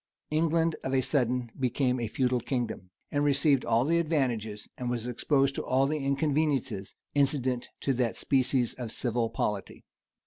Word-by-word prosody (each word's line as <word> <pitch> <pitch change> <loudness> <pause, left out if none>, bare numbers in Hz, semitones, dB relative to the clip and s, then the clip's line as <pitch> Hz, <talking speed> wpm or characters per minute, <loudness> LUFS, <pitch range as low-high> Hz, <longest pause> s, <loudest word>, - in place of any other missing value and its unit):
England 165 +1 +2
of 135 0 -1
a 130 - +4
sudden 125 -3 0
became 130 0 +1
a 115 - -1
feudal 125 +2 +1
kingdom,[] 120 -7 -3 0.2
and 145 0 +1
received 140 -1 +3
all 115 +2 +2
the 170 +3 +3
advantages, 120 -10 -1
and 125 -1 -4
was 120 -2 -2
exposed 135 +3 +1
to - - -3
all 130 +1 +2
the 155 +2 -1
inconveniences, 140 -7 0 0.2
incident 135 -3 +1
to 135 - +1
that 120 -2 0
species 130 -3 +2
of 120 -3 -5
civil 120 -2 -1
polity. 105 -3 -3
130 Hz, 160 wpm, -29 LUFS, 120-145 Hz, 0.2 s, a